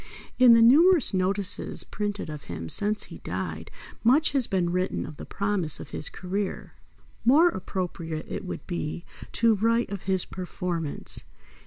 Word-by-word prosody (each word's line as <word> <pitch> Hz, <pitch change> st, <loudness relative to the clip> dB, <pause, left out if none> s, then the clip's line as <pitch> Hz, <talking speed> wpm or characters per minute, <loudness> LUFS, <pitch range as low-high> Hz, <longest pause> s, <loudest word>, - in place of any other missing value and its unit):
In 245 Hz, -2 st, +8 dB
the 230 Hz, -, +6 dB
numerous 310 Hz, -, +6 dB
notices 195 Hz, +1 st, 0 dB
printed 205 Hz, -2 st, -4 dB
of 150 Hz, -2 st, -8 dB
him 80 Hz, -1 st, -6 dB
since 210 Hz, -, +1 dB
he -, -, -11 dB
died -, -, -5 dB, 0.3 s
much 280 Hz, +8 st, +4 dB
has 270 Hz, -4 st, +2 dB
been 180 Hz, -3 st, 0 dB
written 185 Hz, +1 st, -1 dB
of 155 Hz, -, -10 dB
the -, -, -9 dB
promise 200 Hz, -6 st, -1 dB
of -, -, -10 dB
his 150 Hz, -, -2 dB
career. 190 Hz, +2 st, -4 dB, 0.5 s
More 300 Hz, +9 st, +6 dB
appropriate 170 Hz, -, -4 dB
it -, -, -5 dB
would 185 Hz, -, -6 dB
be 170 Hz, -1 st, -4 dB, 0.3 s
to 230 Hz, -1 st, +3 dB
write 230 Hz, +2 st, +1 dB
of 200 Hz, -2 st, -4 dB
his 190 Hz, -2 st, +3 dB
performance. 175 Hz, -4 st, -3 dB
195 Hz, 155 wpm, -26 LUFS, 175-230 Hz, 0.5 s, In